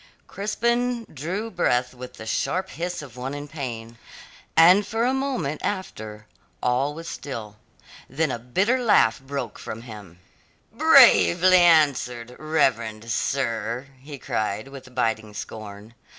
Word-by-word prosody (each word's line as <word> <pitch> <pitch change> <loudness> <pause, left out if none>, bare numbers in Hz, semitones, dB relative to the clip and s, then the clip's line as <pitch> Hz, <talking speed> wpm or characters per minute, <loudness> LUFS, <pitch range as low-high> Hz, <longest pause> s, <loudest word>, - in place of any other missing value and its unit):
Crispin 235 +3 -1
drew 185 +10 -4
breath 125 -8 0
with 125 0 -10
the 110 - -9
sharp 185 +11 -1
hiss 175 -1 -4
of 130 -5 -12
one 130 +3 -5
in 145 0 -7
pain, 120 -6 -7 0.6
and 180 +5 +7
for 225 +2 0
a 255 - +2
moment 260 - -2
after 110 - -5 0.4
all 130 +4 +1
was 165 +1 -8
still. 110 -10 -7 0.5
Then 155 +2 0
a 120 - -3
bitter 190 - 0
laugh 115 - +4
broke 135 -4 -5
from 115 +1 -7
him. 105 -7 -11 0.5
"Bravely 175 - +6
answered, 135 -8 +3
reverend 115 -8 0
sir," 125 +1 -2
he 140 +2 -9
cried 110 0 -3
with 130 -2 -12
biting 110 -3 -1
scorn. 105 +1 -8
135 Hz, 130 wpm, -24 LUFS, 115-175 Hz, 0.6 s, and